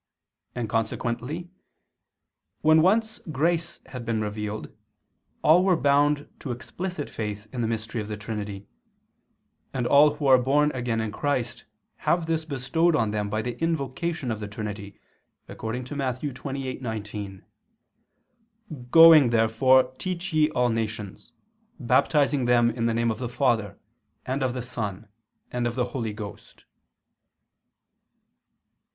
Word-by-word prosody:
And 120 Hz, -2 st, -2 dB
consequently, 120 Hz, -, -2 dB, 1.1 s
when 155 Hz, +1 st, +5 dB
once 220 Hz, +5 st, +2 dB
grace 170 Hz, +4 st, 0 dB
had 125 Hz, -2 st, -8 dB
been 115 Hz, -1 st, -1 dB
revealed, 105 Hz, 0 st, -4 dB, 0.7 s
all 170 Hz, +4 st, +6 dB
were 190 Hz, -2 st, +4 dB
bound 145 Hz, 0 st, +2 dB
to 140 Hz, -, -7 dB
explicit 155 Hz, +6 st, -5 dB
faith 105 Hz, -1 st, -5 dB
in 125 Hz, -, -2 dB
the 115 Hz, -, 0 dB
mystery 110 Hz, 0 st, -3 dB
of 105 Hz, -, -6 dB
the 105 Hz, -1 st, -5 dB
Trinity: 105 Hz, -2 st, -5 dB, 1.1 s
and 125 Hz, -2 st, -1 dB
all 145 Hz, +3 st, +5 dB
who 150 Hz, -, -4 dB
are 130 Hz, -2 st, +7 dB
born 145 Hz, +4 st, +2 dB
again 120 Hz, -4 st, -2 dB
in 110 Hz, -1 st, -3 dB
Christ, 130 Hz, -2 st, -2 dB, 0.3 s
have 170 Hz, -1 st, +1 dB
this 160 Hz, -1 st, -1 dB
bestowed 155 Hz, +4 st, +1 dB
on 110 Hz, -6 st, +1 dB
them 105 Hz, -1 st, -2 dB
by 110 Hz, +1 st, -1 dB
the 120 Hz, +2 st, -5 dB
invocation 160 Hz, -2 st, -2 dB
of 110 Hz, -, -3 dB
the 105 Hz, -, -5 dB
Trinity, 100 Hz, -1 st, -7 dB, 0.5 s
according 115 Hz, +3 st, -5 dB
to 130 Hz, +4 st, -7 dB
Matt. 130 Hz, -3 st, -2 dB
28:19: 120 Hz, -8 st, -5 dB, 1.5 s
"Going 165 Hz, -3 st, +9 dB
therefore 125 Hz, +3 st, +4 dB
teach 185 Hz, +1 st, -4 dB
ye 155 Hz, -1 st, +4 dB
all 125 Hz, -5 st, +1 dB
nations, 110 Hz, -2 st, -4 dB, 0.5 s
baptizing 135 Hz, +1 st, +2 dB
them 120 Hz, -1 st, +4 dB
in 115 Hz, 0 st, -1 dB
the 115 Hz, -, 0 dB
name 115 Hz, 0 st, +1 dB
of 110 Hz, -, -5 dB
the 125 Hz, -2 st, -3 dB
Father, 115 Hz, -5 st, 0 dB, 0.5 s
and 130 Hz, +2 st, -2 dB
of 130 Hz, -1 st, 0 dB
the 125 Hz, -, -3 dB
Son 110 Hz, -4 st, -5 dB, 0.4 s
and 120 Hz, -1 st, -1 dB
of 120 Hz, -, -3 dB
the 125 Hz, -1 st, +1 dB
Holy 115 Hz, -5 st, -2 dB
Ghost." 105 Hz, -1 st, -10 dB
125 Hz, 135 wpm, -26 LUFS, 110-145 Hz, 1.5 s, Going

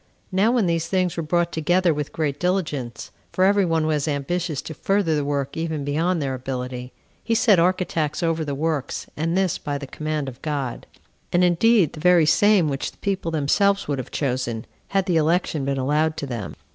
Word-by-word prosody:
Now 195 Hz, +5 st, +3 dB
when 235 Hz, -5 st, +2 dB
these 170 Hz, -1 st, 0 dB
things 185 Hz, -2 st, 0 dB
were 170 Hz, -, -2 dB
brought 170 Hz, +2 st, 0 dB
together 175 Hz, +2 st, +2 dB
with 150 Hz, -1 st, -4 dB
great 145 Hz, -3 st, -2 dB
diligence, 150 Hz, -, -2 dB, 0.2 s
[for 185 Hz, -, +1 dB
every 200 Hz, 0 st, +4 dB
one 165 Hz, -2 st, +1 dB
was 155 Hz, -1 st, 0 dB
ambitious 155 Hz, +2 st, -2 dB
to 160 Hz, -, -6 dB
further 195 Hz, 0 st, +1 dB
the 145 Hz, -, 0 dB
work 140 Hz, -1 st, -2 dB
even 160 Hz, -3 st, -3 dB
beyond 165 Hz, +5 st, 0 dB
their 135 Hz, -3 st, -2 dB
ability,] 125 Hz, -1 st, -5 dB, 0.3 s
he 230 Hz, -, 0 dB
set 210 Hz, -5 st, +5 dB
architects 175 Hz, -3 st, 0 dB
over 165 Hz, -1 st, +1 dB
the 145 Hz, -2 st, -3 dB
works, 155 Hz, -2 st, -2 dB
and 165 Hz, +4 st, -1 dB
this 190 Hz, -2 st, +1 dB
by 145 Hz, -2 st, -3 dB
the 140 Hz, -, -7 dB
command 155 Hz, +1 st, -3 dB
of 130 Hz, -1 st, -8 dB
God; 140 Hz, -5 st, -3 dB, 0.4 s
and 175 Hz, +1 st, +3 dB
indeed 180 Hz, 0 st, +4 dB
the 155 Hz, -, -9 dB
very 175 Hz, -1 st, +5 dB
same 205 Hz, +1 st, +4 dB
which 140 Hz, -2 st, -2 dB
the -, -, -27 dB
people 195 Hz, -4 st, -2 dB
themselves 195 Hz, +6 st, +2 dB
would 140 Hz, -2 st, -1 dB
have 130 Hz, -, -6 dB
chosen, 125 Hz, -5 st, -2 dB, 0.2 s
had 195 Hz, -1 st, 0 dB
the 175 Hz, -3 st, +2 dB
election 160 Hz, -2 st, +1 dB
been 140 Hz, 0 st, -1 dB
allowed 150 Hz, +4 st, +1 dB
to -, -, -3 dB
them. 115 Hz, -8 st, -5 dB
160 Hz, 195 wpm, -23 LUFS, 140-180 Hz, 0.4 s, set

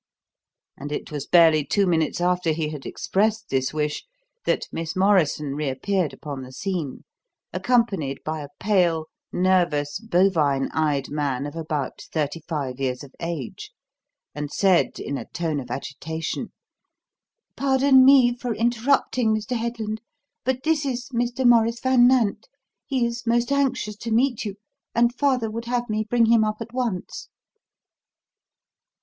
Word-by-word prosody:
And 145 Hz, +1 st, -7 dB
it 150 Hz, -, -4 dB
was 145 Hz, -2 st, -5 dB
barely 160 Hz, -3 st, +6 dB
two 200 Hz, +7 st, +1 dB
minutes 165 Hz, -4 st, +1 dB
after 180 Hz, -2 st, +1 dB
he 155 Hz, -1 st, -2 dB
had 150 Hz, -3 st, -7 dB
expressed 215 Hz, +2 st, 0 dB
this 130 Hz, -1 st, 0 dB
wish 150 Hz, -1 st, -2 dB, 0.4 s
that -, -, +1 dB
Miss 165 Hz, +2 st, -4 dB
Morrison 180 Hz, -7 st, +2 dB
reappeared 150 Hz, +5 st, -1 dB
upon 140 Hz, -3 st, -7 dB
the 130 Hz, 0 st, -9 dB
scene, 165 Hz, -3 st, -4 dB, 0.5 s
accompanied 190 Hz, -, 0 dB
by 155 Hz, 0 st, -3 dB
a 145 Hz, -, -7 dB
pale, 175 Hz, -6 st, +2 dB, 0.3 s
nervous, 175 Hz, -6 st, +1 dB
bovine 170 Hz, -10 st, +2 dB
eyed 145 Hz, -3 st, 0 dB
man 145 Hz, -3 st, -1 dB
of 145 Hz, -, -7 dB
about 155 Hz, -4 st, -3 dB
thirty 155 Hz, +1 st, -2 dB
five 140 Hz, -6 st, -3 dB
years 130 Hz, -1 st, -2 dB
of 140 Hz, -, -13 dB
age, 165 Hz, -7 st, -5 dB, 0.6 s
and 150 Hz, 0 st, -5 dB
said 190 Hz, -3 st, +2 dB
in 140 Hz, -1 st, -3 dB
a -, -, -8 dB
tone 160 Hz, -4 st, -2 dB
of 125 Hz, -3 st, -8 dB
agitation: 155 Hz, +5 st, -4 dB, 1.0 s
"Pardon 265 Hz, -1 st, +5 dB
me 255 Hz, -3 st, +6 dB
for 245 Hz, -2 st, -3 dB
interrupting, 235 Hz, 0 st, +2 dB
Mr. 215 Hz, +3 st, -3 dB
Headland, 225 Hz, -2 st, -3 dB, 0.4 s
but 260 Hz, 0 st, -1 dB
this 315 Hz, -2 st, +1 dB
is 260 Hz, -1 st, -3 dB
Mr. 245 Hz, +1 st, -1 dB
Maurice 230 Hz, 0 st, +4 dB
Van 255 Hz, -2 st, +5 dB
Nant. 250 Hz, -, +2 dB, 0.4 s
He 260 Hz, -4 st, +1 dB
is 235 Hz, 0 st, -4 dB
most 235 Hz, +3 st, +2 dB
anxious 260 Hz, -7 st, 0 dB
to 230 Hz, -, -6 dB
meet 240 Hz, +1 st, +1 dB
you, 200 Hz, -2 st, -4 dB, 0.4 s
and 235 Hz, +1 st, +3 dB
father 250 Hz, -4 st, +1 dB
would 230 Hz, +2 st, -5 dB
have 240 Hz, 0 st, -1 dB
me 215 Hz, 0 st, 0 dB
bring 240 Hz, -1 st, +4 dB
him 225 Hz, -1 st, +5 dB
up 215 Hz, 0 st, 0 dB
at 230 Hz, 0 st, -8 dB
once." 235 Hz, -8 st, -3 dB
195 Hz, 145 wpm, -24 LUFS, 150-235 Hz, 1.0 s, barely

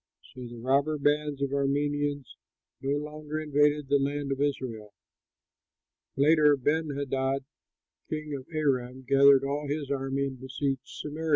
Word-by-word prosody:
So 125 Hz, -1 st, -8 dB
the 120 Hz, 0 st, -10 dB
robber 140 Hz, +5 st, +1 dB
bands 145 Hz, -1 st, +1 dB
of 140 Hz, -, -1 dB
Arameans 145 Hz, 0 st, 0 dB, 0.6 s
no 140 Hz, +1 st, 0 dB
longer 150 Hz, +1 st, -5 dB
invaded 150 Hz, -1 st, +2 dB
the 140 Hz, +1 st, +3 dB
land 140 Hz, 0 st, -2 dB
of 135 Hz, 0 st, -2 dB
Israel. 120 Hz, -7 st, -3 dB, 1.2 s
Later, 150 Hz, 0 st, +5 dB
Benhadad, 140 Hz, -2 st, -1 dB, 0.7 s
king 155 Hz, -1 st, -4 dB
of 135 Hz, -2 st, -6 dB
Aram, 130 Hz, -4 st, -1 dB
gathered 140 Hz, 0 st, +6 dB
all 145 Hz, +2 st, -2 dB
his 145 Hz, -1 st, -3 dB
army 135 Hz, 0 st, -1 dB
and 130 Hz, -2 st, -6 dB
besieged 135 Hz, 0 st, -3 dB
Samaria. 155 Hz, +2 st, -5 dB
140 Hz, 130 wpm, -28 LUFS, 135-150 Hz, 1.2 s, gathered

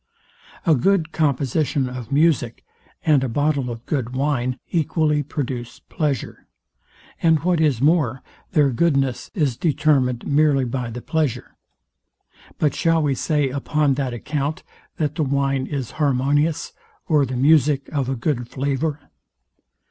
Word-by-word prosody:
A 165 Hz, -, +5 dB
good 165 Hz, +3 st, +2 dB
composition 140 Hz, -2 st, 0 dB
of 125 Hz, -2 st, -7 dB
music 140 Hz, -6 st, +1 dB, 0.4 s
and 150 Hz, -4 st, +4 dB
a 130 Hz, -, -1 dB
bottle 145 Hz, 0 st, 0 dB
of 115 Hz, 0 st, -7 dB
good 130 Hz, -4 st, -2 dB
wine 130 Hz, -2 st, 0 dB
equally 155 Hz, -2 st, +1 dB
produce 130 Hz, -4 st, -5 dB
pleasure; 145 Hz, -6 st, -4 dB, 0.7 s
and 160 Hz, -3 st, +3 dB
what 175 Hz, -1 st, +1 dB
is 140 Hz, -7 st, +2 dB
more, 145 Hz, -5 st, +2 dB, 0.3 s
their 145 Hz, -5 st, +4 dB
goodness 135 Hz, -2 st, 0 dB
is 145 Hz, -, +1 dB
determined 140 Hz, -5 st, +1 dB
merely 145 Hz, -2 st, +3 dB
by 125 Hz, 0 st, -3 dB
the 120 Hz, +1 st, -7 dB
pleasure. 145 Hz, -7 st, -2 dB, 1.0 s
But 150 Hz, -3 st, +1 dB
shall 165 Hz, -2 st, +2 dB
we 145 Hz, -2 st, +1 dB
say 145 Hz, +1 st, 0 dB
upon 145 Hz, +1 st, 0 dB
that 135 Hz, -2 st, -2 dB
account, 145 Hz, +5 st, -3 dB, 0.3 s
that 150 Hz, -2 st, -1 dB
the 160 Hz, -, -1 dB
wine 135 Hz, -1 st, 0 dB
is 135 Hz, -4 st, -4 dB
harmonious, 145 Hz, +3 st, +1 dB, 0.3 s
or 150 Hz, -3 st, +3 dB
the 130 Hz, -1 st, -3 dB
music 145 Hz, 0 st, +3 dB
of 140 Hz, -4 st, -2 dB
a 135 Hz, -, -1 dB
good 125 Hz, -1 st, -2 dB
flavour? 140 Hz, +3 st, -2 dB
140 Hz, 135 wpm, -22 LUFS, 130-155 Hz, 1.0 s, A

